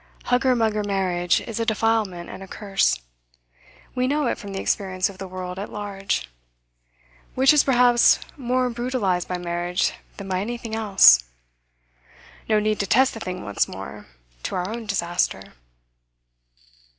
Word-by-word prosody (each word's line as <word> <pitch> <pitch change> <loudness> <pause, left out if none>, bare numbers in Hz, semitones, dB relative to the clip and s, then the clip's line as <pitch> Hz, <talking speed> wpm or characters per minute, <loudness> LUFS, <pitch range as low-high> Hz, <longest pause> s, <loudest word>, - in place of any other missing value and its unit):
Hugger 250 +1 +2
mugger 220 -2 +1
marriage 185 -3 0
is 230 -1 -6
a - - +1
defilement 220 -5 0
and - - -9
a 195 - -9
curse. 195 - 0 0.9
We 255 0 0
know 295 +2 +1
it 235 - -1
from 205 -3 -8
the 195 - -4
experience 190 -1 0
of 190 -2 -12
the 190 - -6
world 185 0 -6
at 200 - -6
large, 195 - -3 1.1
which 265 +3 +5
is 300 - +5
perhaps 245 -2 +5 0.2
more 255 -1 0
brutalised 235 -7 -1
by 180 - -2
marriage 175 0 -1 0.2
than 200 - -7
by 185 -1 -1
anything 230 +2 -5
else. 195 - +6 1.3
No 215 -1 +4
need 215 0 0
to 200 - -1
test 260 +5 +4
the 225 - -7
thing 185 -3 -5
once 100 - 0
more, - - -9 0.3
to - - -4
our 180 0 -1
own 225 +1 -6
disaster. 175 - -1
205 Hz, 150 wpm, -23 LUFS, 185-235 Hz, 1.3 s, else